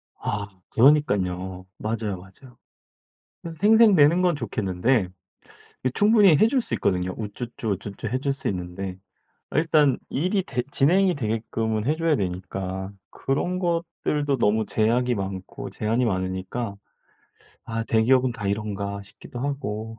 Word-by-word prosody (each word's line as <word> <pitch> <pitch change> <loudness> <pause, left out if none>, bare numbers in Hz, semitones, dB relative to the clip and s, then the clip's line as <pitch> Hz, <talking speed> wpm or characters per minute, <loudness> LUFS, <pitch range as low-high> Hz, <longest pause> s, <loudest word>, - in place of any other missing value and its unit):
아. 105 0 -3 0.2
그러니깐요. 95 -9 +2
맞아요, 110 -3 -2
맞아요. 105 +7 -16 0.8
그래서 165 -1 -8
생색내는 200 -7 +6
건 175 -3 +2
좋겠는데 105 -2 0 0.8
이 130 - +2
충분히 205 -5 +6
해 215 - +5
줄 260 +1 +2
수 125 - -2
있거든요. 90 -3 0
우쭈쭈, 115 +1 -5
우쭈쭈 100 +3 -5
해 130 +4 -1
줄 140 +1 0
수 135 - -2
있는데 90 0 -4 0.5
아 - - -3
일단 155 -5 +3
일이 185 +6 0
되 125 -6 -2
진행이 180 +6 +3
되게끔은 110 -2 -2
해 150 +3 +2
줘야 165 -2 +2
되니까 95 0 -4 0.2
그런 175 +7 -1
것들도 165 -5 -1
너무 110 -1 +2
제약이 120 +3 +1
많고 95 -1 -5
제한이 115 +3 0
많으니까. 95 +2 -3 0.9
'아 115 -1 -3
대기업은 125 +3 +3
다 115 -4 -5
이런가?' 100 -1 -3
싶기도 105 +4 -11
하고. 115 -5 -4
115 Hz, 295 characters per minute, -24 LUFS, 100-145 Hz, 0.9 s, 생색내는